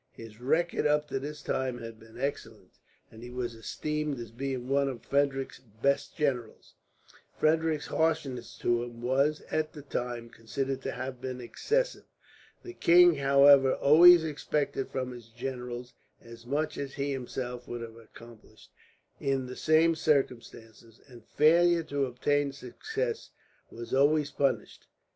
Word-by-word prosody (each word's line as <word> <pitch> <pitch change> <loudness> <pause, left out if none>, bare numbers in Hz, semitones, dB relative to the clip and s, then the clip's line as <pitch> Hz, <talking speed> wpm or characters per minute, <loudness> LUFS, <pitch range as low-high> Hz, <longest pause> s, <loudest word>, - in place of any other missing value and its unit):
His 115 0 -12
record 160 +6 +1
up 150 0 +1
to 135 - -2
this 145 +1 -7
time 130 -2 -2
had 115 -2 -9
been 110 +1 -16
excellent, 115 -8 -5 0.4
and 110 - -13
he 120 - -9
was 125 -1 -4
esteemed 150 +5 -3
as 115 -2 -8
being 130 +1 -4
one 140 +1 +2
of 125 -3 -8
Frederick's 140 -1 0
best 120 +5 -2
generals. 130 -7 -2 0.6
Frederick's 155 -1 +1
harshness 145 -7 -1
to 120 0 +1
him 120 -1 -8
was, 140 +5 +1
at 155 0 -1
the 145 - -10
time, 120 -4 -4
considered 130 +4 -4
to - - -3
have 130 -1 -6
been 130 -1 -5
excessive. - - -1 0.6
The 360 - -9
king, 175 - +6
however, 140 -1 +6
always 170 +4 +7
expected 150 -3 -2
from 130 -1 -3
his 120 -2 -11
generals 125 +1 -6 0.3
as 115 0 -14
much 150 +3 -2
as 140 -1 -5
he 140 0 -2
himself 125 -2 -5
would 120 0 -5
have 115 -1 -9
accomplished, 115 0 -16 0.5
in 135 -1 -1
the 125 0 -8
same 160 +1 +3
circumstances, 115 -6 -2
and 120 -4 -14
failure 170 +6 +4
to 140 -3 -1
obtain 140 +3 0
success 445 - -4 0.4
was 115 0 -8
always 145 +2 +3
punished. 130 -7 -2
135 Hz, 145 wpm, -29 LUFS, 120-150 Hz, 0.6 s, always